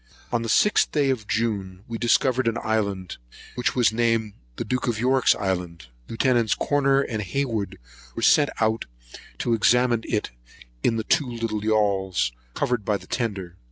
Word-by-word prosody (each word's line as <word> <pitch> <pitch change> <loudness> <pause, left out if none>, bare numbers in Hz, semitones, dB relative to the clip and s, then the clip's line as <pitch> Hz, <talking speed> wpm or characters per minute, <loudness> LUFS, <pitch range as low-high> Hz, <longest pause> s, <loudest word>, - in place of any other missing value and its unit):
On 120 - +1
the 115 - -4
6th 210 - +3
day 145 -3 +2
of 110 -5 -4
June, 100 -5 -2
we 115 -1 -5
discovered 125 +1 +2
an 115 0 +1
island, 100 -5 -2 0.4
which 125 - -1
was 120 -4 +3
named 115 -2 +1 0.2
the - - -4
Duke 125 0 -2
of 115 -2 -1
York's 130 +2 +3
island. 90 -5 -3 0.2
Lieuts. 120 -2 +2
Corner 140 -1 +2
and 110 -5 -3
Hayward 110 0 -2 0.4
were - - -4
sent 145 -2 +5
out 110 0 +1 0.5
to 120 - 0
examine 120 +1 +3
it 105 - -1 0.5
in 115 - +2
the 110 - -2
two 145 +3 +1
yauls, 105 - 0 0.2
covered 125 -4 -1
by 105 +1 0
the - - -15
tender. 95 -6 -4
115 Hz, 155 wpm, -24 LUFS, 105-125 Hz, 0.5 s, sent